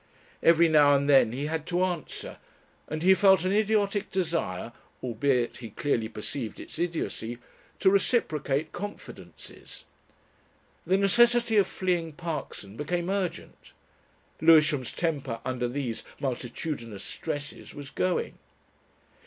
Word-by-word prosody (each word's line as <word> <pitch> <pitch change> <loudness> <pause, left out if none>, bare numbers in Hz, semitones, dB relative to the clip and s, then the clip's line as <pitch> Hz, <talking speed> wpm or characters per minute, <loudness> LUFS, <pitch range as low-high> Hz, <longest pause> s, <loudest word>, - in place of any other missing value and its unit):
Every 170 0 +6
now 145 -3 +6
and 140 0 +1
then 135 -6 +5
he 135 +4 -3
had 160 +1 -3
to 180 +1 +1
answer, 175 -5 -4 0.5
and 155 +2 -4
he 190 +1 +7
felt 190 -2 +5
an 185 - +1
idiotic 205 -1 +1
desire 165 - -2 0.3
albeit 125 0 0
he 115 -3 -8
clearly 115 0 -1
perceived 110 +1 -5
its - - -10
idiocy 160 -9 -3 0.4
to - - +5
reciprocate 155 - +1
confidences. 205 +3 -10 1.0
The 190 - +4
necessity 235 +3 +4
of 200 - +5
fleeing 175 -4 -1
Parkson 150 - -6
became 175 +5 -2
urgent 185 -4 -4 0.7
Lewisham's 155 -5 +5
temper 140 -9 -2
under 125 -1 -1
these 125 -2 -4 0.2
multitudinous 125 -4 -4
stresses 145 -2 -6
was 140 -2 -9
going. 185 +4 -1
155 Hz, 120 wpm, -27 LUFS, 130-185 Hz, 1.0 s, he